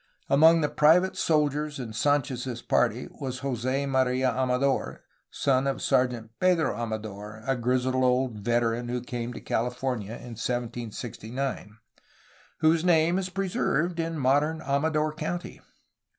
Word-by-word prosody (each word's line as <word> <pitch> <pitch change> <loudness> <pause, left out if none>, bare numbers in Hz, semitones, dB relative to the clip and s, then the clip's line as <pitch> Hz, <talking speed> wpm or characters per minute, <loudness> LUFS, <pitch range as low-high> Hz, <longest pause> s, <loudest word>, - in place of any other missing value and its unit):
Among 160 +4 +6
the 150 - +2
private 165 +6 +4
soldiers 150 -1 +1
in 120 -4 -6
Sanchez's 130 -1 -1
party - - +1
was 130 -2 -4
Jos6 135 +1 -1
Maria 130 -1 +2
Amador 130 +2 0 0.3
(son 135 0 +1
of 135 - -1
Sergeant 120 -3 0
Pedro 180 -3 +2
Amador, 110 -2 -6
a 135 - +1
grizzled 125 +1 0
old 125 -3 +1
veteran 120 +2 0
who 125 0 -1
came 120 -1 -5
to - - -8
Alta - - -24
California 125 -2 -2
in 120 0 -9
1769), 120 -1 -4 0.8
whose 160 +1 +4
name 170 0 +3
is 185 -1 -3
preserved 180 -3 -1
in 165 0 -2
modern 145 +4 +2
Amador 150 +2 0
County. 175 +3 -5
130 Hz, 130 wpm, -27 LUFS, 120-150 Hz, 0.8 s, Among